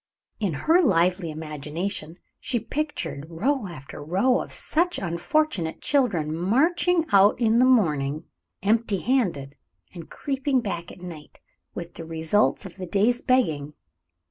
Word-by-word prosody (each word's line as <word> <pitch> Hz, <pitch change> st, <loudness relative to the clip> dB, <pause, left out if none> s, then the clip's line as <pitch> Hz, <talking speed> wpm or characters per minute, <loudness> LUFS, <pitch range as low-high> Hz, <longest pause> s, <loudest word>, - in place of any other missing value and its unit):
In 200 Hz, -6 st, -1 dB
her 325 Hz, -, +3 dB
lively 180 Hz, -, +2 dB
imagination 155 Hz, +3 st, -5 dB, 0.2 s
she 245 Hz, -2 st, -1 dB
pictured 250 Hz, -, -4 dB
row 220 Hz, -, -1 dB
after 145 Hz, -5 st, -9 dB
row 195 Hz, -, +2 dB
of -, -, -8 dB
such 350 Hz, +3 st, 0 dB
unfortunate 175 Hz, -, -1 dB
children, 200 Hz, -, +1 dB
marching 320 Hz, -, +2 dB
out 200 Hz, +2 st, +5 dB
in 230 Hz, -1 st, +3 dB
the 250 Hz, -, +6 dB
morning, 155 Hz, -, +2 dB, 0.4 s
empty 215 Hz, -2 st, +1 dB
handed, 175 Hz, -, 0 dB, 0.4 s
and 170 Hz, -3 st, -10 dB
creeping 270 Hz, -1 st, -1 dB
back 175 Hz, -7 st, -4 dB
at -, -, -14 dB
night 165 Hz, -4 st, -10 dB, 0.4 s
with 170 Hz, 0 st, -7 dB
the 165 Hz, -, -8 dB
results 165 Hz, +6 st, +1 dB
of 185 Hz, -1 st, -10 dB
the 185 Hz, -1 st, -6 dB
day's 220 Hz, +7 st, +2 dB
begging. 155 Hz, -, +1 dB
190 Hz, 135 wpm, -25 LUFS, 160-255 Hz, 0.4 s, the